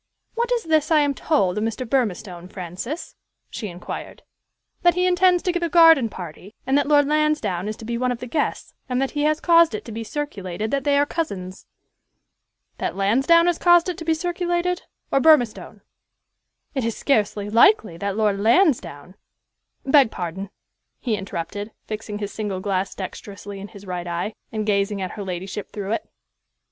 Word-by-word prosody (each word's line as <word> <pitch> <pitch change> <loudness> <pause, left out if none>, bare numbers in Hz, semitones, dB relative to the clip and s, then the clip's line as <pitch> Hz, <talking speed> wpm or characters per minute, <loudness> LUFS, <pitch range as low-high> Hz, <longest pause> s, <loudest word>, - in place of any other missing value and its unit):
"What 475 +1 -1
is 480 -2 +1
this 315 -2 +2
I 310 -2 +5
am 285 -1 +1
told 210 - +1
of - - -1
Mr. 225 +3 -3
Burmistone, 195 -8 -2
Francis?" 190 - -6 0.4
she 215 - -5
inquired. 175 -1 -8 0.6
"That 350 -1 +4
he 360 0 +2
intends 360 0 +3
to 360 - +1
give 350 0 -2
a 340 - 0
garden 325 -8 +6
party, 180 +3 -9
and 265 +1 +1
that 285 -1 +2
Lord 290 -1 +4
Lansdowne 300 - 0
is 215 - -4
to 225 - -10
be 235 +1 -3
one 250 0 +1
of 245 - -2
the 250 - -7
guests, 295 +5 -2 0.2
and 250 0 0
that 270 0 0
he 295 -1 -1
has 305 +1 +2
caused 335 -7 +5
it - - -6
to 230 - -8
be 225 +1 -5
circulated 215 -7 -4
that 275 -1 -1
they 285 -1 +3
are 285 - +4
cousins." 195 - -5 1.1
"That - - -2
Lansdowne 265 - +4
has 350 -1 +1
caused 345 0 +5
it 350 - -4
to - - -5
be 325 0 +1
circulated 350 +1 -1 0.3
or 275 - +4
Burmistone?" 270 -7 +3 0.9
"It 265 -4 -1
is 230 -1 -2
scarcely 210 -6 +1
likely 225 - +4
that 200 +2 -3
Lord 210 -2 +1
Lansdowne" 215 - +2 0.7
"Beg 270 -3 +5
pardon," 185 +1 -5 0.5
he 235 -4 -1
interrupted, 200 +2 -5
fixing 215 -1 -5
his 205 -1 -5
single 205 -4 -3
glass 190 0 -2
dexterously 200 +1 -7
in 200 - -7
his 200 -1 -13
right 180 -2 -4
eye, 175 +5 -3 0.2
and 215 -2 -2
gazing 200 -1 0
at 185 -1 -3
her 205 - -6
ladyship 190 +2 -5
through 200 -1 -5
it. 225 - -2
225 Hz, 180 wpm, -23 LUFS, 200-305 Hz, 1.1 s, garden